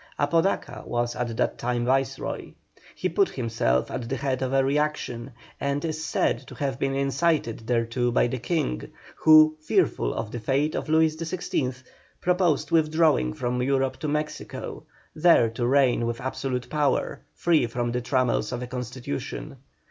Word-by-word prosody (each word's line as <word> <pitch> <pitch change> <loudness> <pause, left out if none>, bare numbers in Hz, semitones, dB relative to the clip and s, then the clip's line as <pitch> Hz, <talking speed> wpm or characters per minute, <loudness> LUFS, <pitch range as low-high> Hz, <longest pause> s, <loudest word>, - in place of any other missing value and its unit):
Apodaca 165 +6 0
was 120 0 -1
at 120 -2 -3
that - - 0
time 120 0 -1
Viceroy. 135 +1 -1 0.4
He - - -1
put 395 -2 +2
himself 115 - 0
at 115 -1 -4
the 135 - -1
head 135 -1 -2
of 130 -1 -1
a 135 0 +3
reaction, 135 -3 -1 0.3
and 140 +2 -1
is 160 -1 -3
said 115 - +1
to - - -10
have 135 -3 -2
been 135 -1 0
incited 140 -5 0
thereto 120 0 +1
by - - +3
the 125 +1 -2
King, 125 - -2 0.3
who, 155 0 +7
fearful 105 - +1
of 110 -1 -4
the 120 - -4
fate 140 +7 0
of - - -3
Louis 160 0 +3
XVI., 155 -6 -3 0.4
proposed 180 -4 +1
withdrawing 155 - +3
from 125 0 -2
Europe 135 0 +1
to 155 - -4
Mexico, 150 +1 -4 0.3
there 155 -7 +5
to 120 +2 -2
reign 125 -3 +3
with 115 0 -3
absolute 130 -1 -3
power, 145 0 0 0.2
free 160 -8 +2
from 120 0 -2
the 125 +1 -1
trammels 125 -4 +1
of 125 0 -3
a - - -3
Constitution. 130 +3 -5
135 Hz, 160 wpm, -26 LUFS, 120-150 Hz, 0.4 s, who